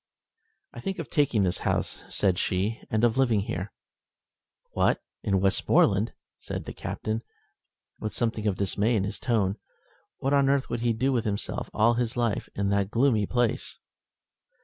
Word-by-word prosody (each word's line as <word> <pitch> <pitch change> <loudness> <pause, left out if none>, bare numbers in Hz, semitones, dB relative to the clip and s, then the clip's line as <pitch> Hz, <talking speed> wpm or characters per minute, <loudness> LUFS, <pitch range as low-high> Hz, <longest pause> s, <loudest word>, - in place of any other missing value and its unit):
"I - - -8
think 195 -1 -3
of - - -6
taking 140 - +3
this 90 -2 +1
house," - - -1
said 95 -3 +1
she, 100 +5 -1
"and 110 +1 0
of 120 +2 +3
living 120 -6 +3
here." 95 0 -4 1.0
"What, - - +2 0.2
in 100 -2 +1
Westmoreland!" 100 +2 +3 0.3
said - - -5
the - - -6
Captain, 110 +1 -3 0.8
with 110 - -3
something 110 -2 -1
of 95 -3 0
dismay 105 +4 +1
in 100 - +1
his 100 - -3
tone. 105 -5 +1 0.6
What 135 +2 0
on 140 -1 +4
earth 140 -1 +1
would 120 - -2
he 120 -1 +2
do 130 +5 +1
with 120 -2 0
himself 100 -1 -2
all 115 +2 +4
his 120 0 -1
life 120 -3 0
in 100 0 0
that 100 -1 +1
gloomy 115 -3 +2
place! 120 -2 0
110 Hz, 165 wpm, -27 LUFS, 100-120 Hz, 1.0 s, on